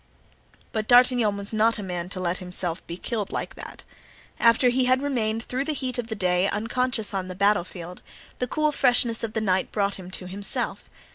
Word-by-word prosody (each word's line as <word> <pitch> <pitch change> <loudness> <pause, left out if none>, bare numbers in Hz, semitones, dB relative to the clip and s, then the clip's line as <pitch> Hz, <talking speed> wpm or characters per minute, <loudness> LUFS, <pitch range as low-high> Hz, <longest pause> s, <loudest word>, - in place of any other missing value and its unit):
But 215 -1 -2
D'Artagnan 245 -4 +5
was 200 +2 -7
not 225 +2 +3
a 205 - -5
man 180 -2 -4
to 185 - -5
let 180 0 -1
himself 180 -1 -3
be 170 - -5
killed 215 0 -3
like - - -3
that. - - -10 0.6
After 235 +2 +5
he 255 +1 +2
had 255 +2 +3
remained 225 -5 0
through 260 +3 -2
the 310 - -1
heat 255 -3 -3
of 235 - -3
the 220 - -4
day 180 -1 +2
unconscious 225 0 -1
on 190 -1 -2
the 185 - -6
battle 200 0 +3
field, 175 0 -9 0.4
the 250 - -1
cool 305 +3 +1
freshness 245 -4 +2
of 220 -1 -3
the 220 - -1
night 190 -3 +1
brought 200 -2 0
him 180 -1 -9
to 185 0 -7
himself. 200 +2 -1
215 Hz, 205 wpm, -25 LUFS, 185-245 Hz, 0.6 s, D'Artagnan